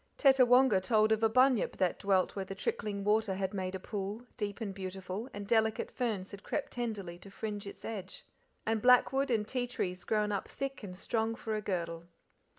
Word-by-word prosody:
Tettawonga 255 Hz, -6 st, +6 dB
told 215 Hz, +2 st, +3 dB
of 220 Hz, 0 st, +3 dB
a 225 Hz, -, +4 dB
Bunyip 255 Hz, 0 st, +3 dB
that 185 Hz, -2 st, +1 dB
dwelt 195 Hz, -2 st, +2 dB
where 195 Hz, -, -2 dB
the 195 Hz, +1 st, -7 dB
trickling 210 Hz, -, -2 dB
water 210 Hz, -1 st, +2 dB
had 190 Hz, 0 st, -2 dB
made 185 Hz, -1 st, -3 dB
a -, -, -4 dB
pool, 205 Hz, +4 st, -5 dB
deep 205 Hz, -1 st, -3 dB
and 210 Hz, -4 st, -3 dB
beautiful, 190 Hz, +4 st, -5 dB
and 205 Hz, 0 st, -6 dB
delicate 220 Hz, 0 st, +1 dB
ferns 215 Hz, -7 st, -2 dB
had 200 Hz, -, -9 dB
crept 290 Hz, -, -3 dB
tenderly 205 Hz, -8 st, -4 dB
to 195 Hz, -, -12 dB
fringe 205 Hz, 0 st, -5 dB
its -, -, -9 dB
edge, 195 Hz, -4 st, -6 dB, 0.4 s
and 220 Hz, -1 st, +1 dB
blackwood, 260 Hz, +3 st, +5 dB
and 215 Hz, -3 st, +1 dB
ti 250 Hz, 0 st, -1 dB
trees 180 Hz, -6 st, -3 dB
grown 210 Hz, -1 st, +1 dB
up 200 Hz, -, -2 dB
thick 275 Hz, 0 st, -5 dB
and 185 Hz, -4 st, -8 dB
strong 225 Hz, +3 st, -1 dB
for 220 Hz, -1 st, -4 dB
a 215 Hz, -, -2 dB
girdle. 170 Hz, -4 st, -3 dB
210 Hz, 195 wpm, -32 LUFS, 190-230 Hz, 0.4 s, Tettawonga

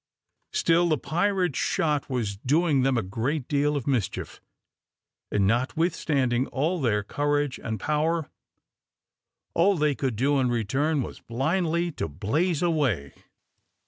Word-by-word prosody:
Still 170 Hz, +1 st, +3 dB
the 155 Hz, -, +2 dB
pirate's 180 Hz, +1 st, 0 dB
shot 150 Hz, -3 st, 0 dB
was 115 Hz, -6 st, -2 dB
doing 145 Hz, -, +2 dB
them 130 Hz, -1 st, +2 dB
a 115 Hz, -, 0 dB
great 120 Hz, +9 st, -2 dB
deal 145 Hz, 0 st, +1 dB
of 135 Hz, -, -4 dB
mischief, 125 Hz, -9 st, -2 dB, 0.9 s
and, 100 Hz, -2 st, +2 dB
notwithstanding 130 Hz, -, +1 dB
all 160 Hz, +6 st, -1 dB
their 105 Hz, -5 st, +1 dB
courage 145 Hz, +3 st, -1 dB
and 110 Hz, -2 st, -3 dB
power, 155 Hz, -, 0 dB, 1.3 s
all 190 Hz, +3 st, +3 dB
they 150 Hz, -1 st, +2 dB
could 130 Hz, -4 st, -2 dB
do 140 Hz, +5 st, +2 dB
in 130 Hz, -2 st, +2 dB
return 135 Hz, +6 st, 0 dB
was -, -, -8 dB
blindly 170 Hz, +7 st, 0 dB
to -, -, -3 dB
blaze 145 Hz, -, 0 dB
away. 135 Hz, -, 0 dB
145 Hz, 130 wpm, -26 LUFS, 120-160 Hz, 1.3 s, Still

